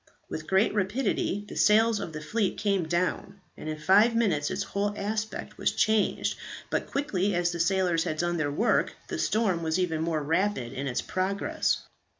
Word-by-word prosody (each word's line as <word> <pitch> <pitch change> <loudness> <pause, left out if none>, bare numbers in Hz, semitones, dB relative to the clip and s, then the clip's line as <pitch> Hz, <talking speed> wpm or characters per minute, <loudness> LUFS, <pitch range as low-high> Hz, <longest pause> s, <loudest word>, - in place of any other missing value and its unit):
With 155 - -6
great 190 +3 +3
rapidity 205 -1 0
the - - -9
sails 220 +1 +4
of 185 -5 -5
the 155 -1 -6
fleet 200 +5 -1
came 195 -5 0
down, 180 +3 -1 0.2
and 155 - -7
in 155 - -3
five 205 +9 +4
minutes 170 -11 +1
its 195 - -2
whole 205 +1 -2
aspect 215 +2 -4
was - - +1
changed; 215 -1 +1 0.3
but - - -1
quickly 205 -9 0
as 175 0 +1
the 170 - -5
sailors 175 -1 +2
had 155 -3 -2
done 175 +1 0
their 150 -3 0
work, 220 +11 +1 0.2
the - - -3
storm 205 -6 +1
was 160 +1 0
even 165 -4 0
more 160 -2 -1
rapid 165 -5 0
in 140 +2 -3
its 120 - -1
progress. 190 +2 -1
190 Hz, 180 wpm, -28 LUFS, 165-205 Hz, 0.3 s, sails